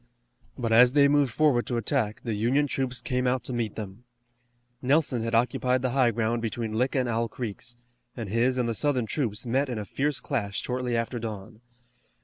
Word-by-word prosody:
But 120 Hz, -3 st, -2 dB
as 125 Hz, +2 st, +7 dB
they 140 Hz, -1 st, +6 dB
moved 140 Hz, -3 st, +3 dB
forward 135 Hz, -2 st, +2 dB
to 120 Hz, -, -1 dB
attack 115 Hz, -2 st, -1 dB
the 115 Hz, -, -2 dB
Union 120 Hz, +8 st, +2 dB
troops 130 Hz, -3 st, -2 dB
came 125 Hz, -1 st, -1 dB
out 125 Hz, 0 st, 0 dB
to 130 Hz, -, -5 dB
meet 115 Hz, -3 st, -2 dB
them. 105 Hz, +1 st, -7 dB, 0.8 s
Nelson 135 Hz, -2 st, +2 dB
had 115 Hz, 0 st, -1 dB
occupied 125 Hz, +2 st, +1 dB
the 130 Hz, -, +1 dB
high 130 Hz, -2 st, +3 dB
ground 115 Hz, +1 st, -1 dB
between 115 Hz, -1 st, -3 dB
Lick 125 Hz, +5 st, 0 dB
and 130 Hz, -2 st, +1 dB
Owl 115 Hz, 0 st, 0 dB
Creeks, 120 Hz, +1 st, -7 dB, 0.4 s
and 115 Hz, -3 st, -4 dB
his 120 Hz, +5 st, +1 dB
and 125 Hz, -2 st, +1 dB
the 115 Hz, -, 0 dB
Southern 130 Hz, 0 st, 0 dB
troops 110 Hz, -2 st, -3 dB
met 135 Hz, +4 st, 0 dB
in 120 Hz, -, -3 dB
a 105 Hz, -, -4 dB
fierce 145 Hz, +7 st, -1 dB
clash 105 Hz, -8 st, -2 dB
shortly 125 Hz, -1 st, -2 dB
after 115 Hz, +1 st, -2 dB
dawn. 110 Hz, 0 st, -7 dB
120 Hz, 195 wpm, -27 LUFS, 115-130 Hz, 0.8 s, as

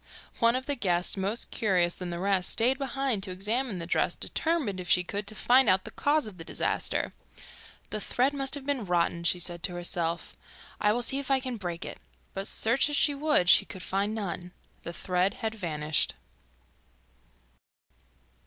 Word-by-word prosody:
One 230 Hz, +1 st, +4 dB
of 260 Hz, 0 st, -2 dB
the 285 Hz, -, +1 dB
guests, 180 Hz, -8 st, +1 dB
more 195 Hz, +2 st, -1 dB, 0.2 s
curious 180 Hz, -6 st, +2 dB
than 180 Hz, -1 st, -6 dB
the 170 Hz, -, -4 dB
rest, 190 Hz, 0 st, +1 dB
stayed 245 Hz, +5 st, +2 dB
behind 270 Hz, -5 st, -1 dB
to 190 Hz, -, -4 dB
examine 210 Hz, +4 st, -1 dB
the 170 Hz, -, -4 dB
dress, 170 Hz, -, +1 dB
determined, 300 Hz, -, -1 dB
if 180 Hz, -1 st, -6 dB
she 180 Hz, -, +4 dB
could, 200 Hz, +3 st, -4 dB
to 215 Hz, -, -7 dB
find 250 Hz, +2 st, +5 dB
out 185 Hz, 0 st, +3 dB
the -, -, -7 dB
cause 300 Hz, +1 st, +1 dB
of 200 Hz, -5 st, -8 dB
the -, -, -6 dB
disaster. -, -, -1 dB, 0.8 s
'The 215 Hz, -, -3 dB
thread 260 Hz, +7 st, +1 dB
must 275 Hz, 0 st, 0 dB
have 280 Hz, -2 st, -7 dB
been 280 Hz, -4 st, 0 dB
rotten,' 170 Hz, -2 st, 0 dB
she 175 Hz, -, +2 dB
said 175 Hz, -1 st, -3 dB
to 180 Hz, 0 st, -3 dB
herself. 170 Hz, -1 st, -3 dB, 0.4 s
'I 210 Hz, 0 st, +3 dB
will 240 Hz, -, -1 dB
see 270 Hz, +3 st, +2 dB
if 280 Hz, -, -5 dB
I 270 Hz, -1 st, +4 dB
can 255 Hz, -2 st, -4 dB
break 175 Hz, -3 st, -5 dB
it.' -, -, -7 dB, 0.3 s
But 195 Hz, +1 st, -4 dB
search 240 Hz, +6 st, +3 dB
as 295 Hz, -, -1 dB
she 290 Hz, -, +3 dB
would 285 Hz, -, +2 dB
she -, -, +7 dB
could 185 Hz, -, -9 dB
find 200 Hz, +3 st, -1 dB
none. 180 Hz, -4 st, -5 dB, 0.3 s
The 170 Hz, -, -6 dB
thread 180 Hz, +2 st, 0 dB
had 220 Hz, -2 st, -3 dB
vanished! 155 Hz, -7 st, -1 dB
200 Hz, 190 wpm, -28 LUFS, 180-255 Hz, 0.8 s, she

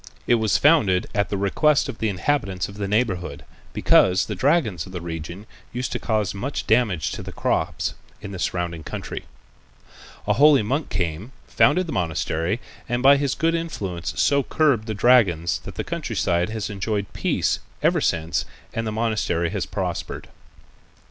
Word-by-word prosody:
It -, -, +3 dB
was 110 Hz, -2 st, +3 dB
founded 110 Hz, -, +4 dB
at 100 Hz, 0 st, 0 dB
the 100 Hz, -, -1 dB
request 140 Hz, +10 st, +2 dB
of 110 Hz, -, -7 dB
the 110 Hz, -, +1 dB
inhabitants 95 Hz, -3 st, -1 dB
of 100 Hz, -, -11 dB
the 100 Hz, -1 st, -2 dB
neighborhood, 100 Hz, -4 st, -1 dB, 0.3 s
because 90 Hz, 0 st, +4 dB
the -, -, -4 dB
dragons 135 Hz, -, +1 dB
of 95 Hz, -, -11 dB
the 90 Hz, -, -3 dB
region 85 Hz, +3 st, -6 dB, 0.3 s
used 125 Hz, +1 st, -3 dB
to -, -, -2 dB
cause 110 Hz, -4 st, 0 dB
much 125 Hz, +9 st, -4 dB
damage 110 Hz, -, +2 dB
to -, -, -5 dB
the -, -, -8 dB
crops -, -, -1 dB, 0.3 s
in 100 Hz, -, -8 dB
the 95 Hz, -, -6 dB
surrounding 85 Hz, -3 st, -2 dB
country. -, -, -6 dB, 1.0 s
A 105 Hz, -, +4 dB
holy 140 Hz, +1 st, +6 dB
monk 135 Hz, +8 st, -1 dB
came, 90 Hz, +8 st, -3 dB
founded 180 Hz, +6 st, +3 dB
the 165 Hz, -, -5 dB
monastery, 85 Hz, +3 st, -1 dB, 0.3 s
and 120 Hz, +1 st, -1 dB
by 140 Hz, +1 st, +8 dB
his 140 Hz, -5 st, 0 dB
good 165 Hz, +3 st, +1 dB
influence 100 Hz, -, -4 dB
so 140 Hz, 0 st, +4 dB
curbed 135 Hz, -5 st, +1 dB
the 110 Hz, -, -3 dB
dragons 95 Hz, -8 st, +3 dB
that -, -, -8 dB
the -, -, -3 dB
country -, -, -4 dB
side 85 Hz, +2 st, +1 dB
has 110 Hz, -1 st, -4 dB
enjoyed 100 Hz, 0 st, -3 dB
peace -, -, 0 dB, 0.2 s
ever -, -, +3 dB
since 85 Hz, 0 st, 0 dB, 0.3 s
and 115 Hz, 0 st, -2 dB
the -, -, -1 dB
monastery 105 Hz, -7 st, 0 dB
has -, -, -2 dB
prospered. -, -, -4 dB
105 Hz, 170 wpm, -23 LUFS, 90-125 Hz, 1.0 s, by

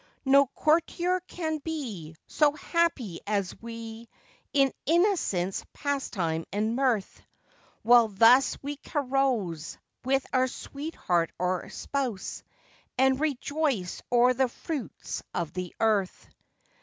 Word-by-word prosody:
No 275 Hz, +1 st, +6 dB
courtier 340 Hz, +5 st, +1 dB
can 315 Hz, -3 st, -3 dB
be 235 Hz, -, -5 dB
So 295 Hz, -2 st, +3 dB
happy 300 Hz, -, -1 dB
as 200 Hz, -3 st, -1 dB
we, 230 Hz, 0 st, -8 dB, 0.4 s
In 275 Hz, -2 st, +3 dB
innocence, 325 Hz, -, +1 dB
pastime, 185 Hz, -, -2 dB
and 215 Hz, +4 st, 0 dB
mirth; 250 Hz, -7 st, 0 dB, 0.6 s
While 235 Hz, 0 st, +7 dB
thus 230 Hz, +6 st, +5 dB
we 290 Hz, +1 st, -4 dB
carouse, 255 Hz, -, -1 dB, 0.3 s
With 270 Hz, +1 st, +1 dB
our 255 Hz, 0 st, +3 dB
sweetheart 255 Hz, -, -2 dB
or 180 Hz, 0 st, -1 dB
spouse, 255 Hz, -8 st, -3 dB, 0.6 s
And 265 Hz, 0 st, +3 dB
rejoice 285 Hz, -, -1 dB
o'er 245 Hz, +1 st, +5 dB
the 260 Hz, 0 st, +1 dB
fruits 285 Hz, -, -5 dB
of 170 Hz, -2 st, -2 dB
the 180 Hz, -1 st, -5 dB
earth. 210 Hz, -4 st, +1 dB
250 Hz, 105 wpm, -28 LUFS, 200-285 Hz, 0.6 s, While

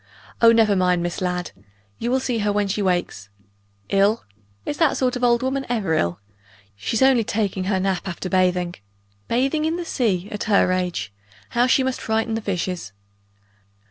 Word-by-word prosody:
Oh, 230 Hz, -1 st, +8 dB
never 220 Hz, -3 st, +4 dB
mind 180 Hz, -2 st, +2 dB
Miss 175 Hz, +1 st, -3 dB
Ladd. 180 Hz, -1 st, -2 dB, 0.5 s
You 235 Hz, -, -2 dB
will 260 Hz, +1 st, +2 dB
see 245 Hz, -3 st, -1 dB
her 205 Hz, 0 st, +1 dB
when 205 Hz, 0 st, 0 dB
she 200 Hz, +2 st, -1 dB
wakes. 175 Hz, -, -1 dB, 0.6 s
Ill? 200 Hz, +3 st, +2 dB, 0.4 s
Is 290 Hz, -, -3 dB
that 320 Hz, -4 st, +2 dB
sort 255 Hz, -1 st, +1 dB
of 250 Hz, -, -4 dB
old 240 Hz, 0 st, +3 dB
woman 270 Hz, +1 st, -1 dB
ever 215 Hz, -9 st, 0 dB
ill? 85 Hz, -, 0 dB, 0.6 s
She's 215 Hz, -, 0 dB
only 260 Hz, -3 st, +5 dB
taking 200 Hz, -3 st, -1 dB
her 190 Hz, -1 st, +1 dB
nap 190 Hz, 0 st, -1 dB
after 185 Hz, 0 st, -4 dB
bathing. 180 Hz, -1 st, +1 dB, 0.5 s
Bathing 270 Hz, +6 st, +1 dB
in 320 Hz, +1 st, 0 dB
the 350 Hz, 0 st, -4 dB
sea, 205 Hz, -, 0 dB
at 210 Hz, -, -4 dB
her 200 Hz, -3 st, +3 dB
age! 180 Hz, -, -2 dB, 0.4 s
How 240 Hz, +1 st, +2 dB
she 260 Hz, +1 st, +3 dB
must 260 Hz, -1 st, -2 dB
frighten 220 Hz, 0 st, -1 dB
the 225 Hz, -, -2 dB
fishes!" 180 Hz, -, -3 dB
205 Hz, 175 wpm, -22 LUFS, 180-245 Hz, 0.6 s, Oh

